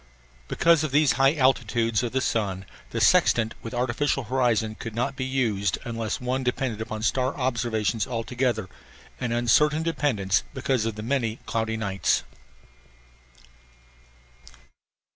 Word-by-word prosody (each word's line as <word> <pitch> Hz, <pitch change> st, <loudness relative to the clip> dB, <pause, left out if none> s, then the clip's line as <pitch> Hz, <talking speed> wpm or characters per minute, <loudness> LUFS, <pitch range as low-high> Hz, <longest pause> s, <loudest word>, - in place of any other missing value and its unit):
Because 165 Hz, -2 st, +3 dB
of 155 Hz, -, -1 dB
these 145 Hz, +1 st, +4 dB
high 135 Hz, +3 st, +3 dB
altitudes 120 Hz, -5 st, +2 dB
of 120 Hz, -2 st, -2 dB
the 130 Hz, -, 0 dB
sun 100 Hz, -6 st, -1 dB, 0.2 s
the -, -, -3 dB
sextant 115 Hz, -1 st, +4 dB
with 115 Hz, -, -7 dB
artificial 130 Hz, +3 st, 0 dB
horizon 115 Hz, -3 st, +1 dB
could 110 Hz, 0 st, -8 dB
not 130 Hz, +4 st, -1 dB
be 130 Hz, -, -3 dB
used 110 Hz, -8 st, 0 dB
unless 115 Hz, -2 st, -3 dB
one 125 Hz, +1 st, -2 dB
depended 125 Hz, -3 st, -2 dB
upon 110 Hz, -1 st, -5 dB
star 130 Hz, +4 st, 0 dB
observations 120 Hz, -4 st, -1 dB
altogether, 120 Hz, -3 st, -1 dB, 0.5 s
an 120 Hz, -, -2 dB
uncertain 150 Hz, +7 st, +3 dB
dependence 130 Hz, -, +1 dB
because 130 Hz, -3 st, 0 dB
of 115 Hz, -, -3 dB
the 105 Hz, -, -6 dB
many 115 Hz, -3 st, 0 dB
cloudy 110 Hz, -1 st, -1 dB
nights. 100 Hz, -3 st, 0 dB
120 Hz, 130 wpm, -25 LUFS, 110-130 Hz, 0.5 s, these